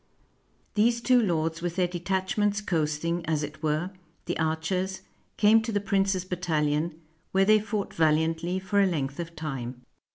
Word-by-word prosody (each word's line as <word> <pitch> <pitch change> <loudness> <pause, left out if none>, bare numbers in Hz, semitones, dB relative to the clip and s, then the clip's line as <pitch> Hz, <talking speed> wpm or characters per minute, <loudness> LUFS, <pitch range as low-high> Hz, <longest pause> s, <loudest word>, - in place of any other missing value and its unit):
These 235 +3 +2
two 250 0 +4
lords 165 -4 0
with 175 -1 -3
their 180 -1 +2
de 175 0 -5
tachments 205 +3 0
coasting, 165 0 0
as 155 -2 0
it 150 +1 -7
were, 155 +4 0 0.3
the - - -2
archers, 170 +4 -1 0.4
came 220 +2 +6
to 225 +1 -3
the 205 - +1
prince's 195 -2 +1
battalion, 160 -3 -1 0.3
where 195 0 +4
they 215 +1 +6
fought 210 -1 -3
vahantly 160 +3 +1
for 195 +2 +1
a 195 - +4
length 140 -5 -2
of 170 -1 -5
time. 130 -5 -5
175 Hz, 160 wpm, -27 LUFS, 160-195 Hz, 0.4 s, came